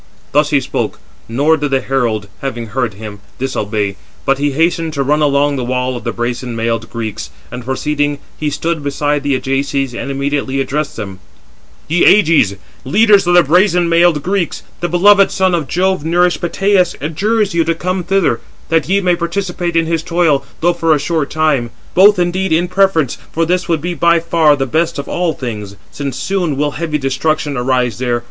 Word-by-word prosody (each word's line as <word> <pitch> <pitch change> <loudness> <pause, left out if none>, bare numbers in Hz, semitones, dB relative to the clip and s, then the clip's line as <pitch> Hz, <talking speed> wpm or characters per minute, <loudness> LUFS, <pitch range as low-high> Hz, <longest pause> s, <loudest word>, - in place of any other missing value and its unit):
Thus 150 +1 +3
he 145 - +3
spoke, 130 - -3 0.3
nor 145 +7 +2
did 145 -1 -2
the 135 -1 +2
herald, 120 -6 -1
having 120 -4 -4
heard 120 -2 -2
him, 105 -1 -8 0.2
disobey, 105 -6 -2 0.3
but 135 0 +2
he 145 0 0
hastened 165 +1 0
to 140 -2 -1
run 150 +3 +1
along 145 -1 +2
the 130 - -2
wall 125 +1 -1
of 120 - -7
the - - -1
brazen 120 0 -3
mailed 115 0 -2
Greeks, 110 -3 -5 0.2
and 125 0 -6
proceeding, 145 +3 -1 0.2
he 150 - -2
stood 165 +2 -2
beside 145 +1 -1
the 140 -1 0
Ajaces 135 0 -1
and 130 +4 -5
immediately 140 0 -1
addressed 140 +3 -2
them: 100 -4 -7 0.7
"Ye 170 +3 +2
Ajaces, 160 - +4 0.3
leaders 205 - +4
of 175 - +4
the 175 - +7
brazen 175 +3 +3
mailed 165 -3 +3
Greeks, 190 -2 -2 0.2
the 175 - -2
beloved 195 +3 +5
son 190 -1 +1
of 165 -5 -1
Jove 185 0 0
nourished 175 +2 +1
Peteus 185 0 +1
adjures 205 +7 0
you 170 -1 +2
to 165 0 0
come 185 +2 -2
thither, 195 0 +1 0.3
that 165 0 +1
ye 200 +1 +2
may 180 -2 +2
participate 175 0 -3
in 165 -1 +3
his 165 -1 -1
toil, 165 -4 +1 0.2
though 175 +2 +3
for 165 -2 +2
a - - -1
short 155 0 -1
time. 150 -6 +1 0.2
Both 200 +2 +6
indeed 180 +1 0
in 170 +2 +2
preference, 180 -8 +1
for 165 +1 0
this 180 +2 -1
would 165 -3 +1
be 175 +2 -2
by 170 0 +3
far 165 -2 +3
the 135 -1 -1
best 165 +5 0
of 140 - -5
all 175 -2 -1
things, 105 -7 -6 0.2
since 140 -3 -5
soon 180 -7 -1
will 145 +1 0
heavy 155 0 -2
destruction 145 +2 -1
arise 125 -2 0
there. 120 -2 0
150 Hz, 190 wpm, -15 LUFS, 135-175 Hz, 0.7 s, the